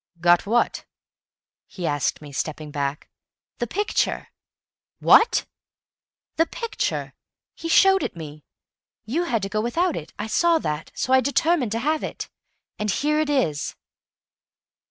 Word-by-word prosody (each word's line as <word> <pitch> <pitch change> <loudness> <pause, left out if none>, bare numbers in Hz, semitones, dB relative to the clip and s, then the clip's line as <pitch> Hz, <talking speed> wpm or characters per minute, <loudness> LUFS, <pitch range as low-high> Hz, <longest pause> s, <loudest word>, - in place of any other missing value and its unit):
"Got 175 +2 +4
what?" 235 +3 +1 0.8
he 180 - -6
asked 145 0 -1
me, 145 - -10
stepping 150 +2 -4
back. 140 0 -3 0.5
"The 240 - -1
picture!" 415 - -1 0.7
"WHAT?" 450 - +5 0.9
"The 325 - +3
picture. 465 -1 -3 0.4
He 330 - -6
showed 385 +2 +6
it - - -3
me. 155 -2 -9 0.6
You 310 +11 -1
had 230 - -1
to - - -1
go 215 +2 -1
without 330 +10 0
it; 155 - -7
I 210 - -3
saw 335 +9 +3
that. 150 - -4
So 260 - 0
I 260 - +6
determined 280 -3 +1
to 230 - -1
have 310 0 +1
it. - - -6 0.5
And 210 0 -1
here 300 +9 +1
it 310 -1 0
is." 205 - 0
235 Hz, 140 wpm, -24 LUFS, -, 0.9 s, showed